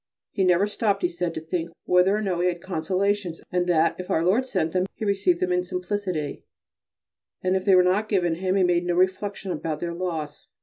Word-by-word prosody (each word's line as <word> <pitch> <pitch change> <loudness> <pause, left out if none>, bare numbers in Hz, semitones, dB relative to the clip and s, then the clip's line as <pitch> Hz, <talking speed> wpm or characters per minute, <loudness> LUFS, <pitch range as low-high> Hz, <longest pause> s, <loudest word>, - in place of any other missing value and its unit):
He 195 - 0
never 180 +1 +4
stopped, 205 -1 -1
he - - +4
said, 175 -1 -3
to - - -2
think 165 +1 -3 0.2
whether 180 +2 +4
or 215 - -2
no 185 -4 -1
he 180 - +2
had 175 -1 -1
consolations, 185 +1 -1
and 180 -1 0
that 165 -1 +3
if 180 - -6
Our 160 - +1
Lord 230 +9 +2
sent 170 -9 -1
them 185 0 +1
he 220 - -4
received 195 -4 +2
them 180 0 0
in 180 0 +1
simplicity; 180 -4 -3 1.0
if 185 0 +1
they 195 -2 +6
were 180 - +6
not 200 +4 +1
given 175 -4 +2
him 185 +3 -1
he 195 - +3
made 175 -1 +2
no 175 - +1
reflections 190 +1 0
about 155 -2 -3
their 170 +1 -3
loss. 165 -4 -5
180 Hz, 215 wpm, -25 LUFS, 170-195 Hz, 1.0 s, they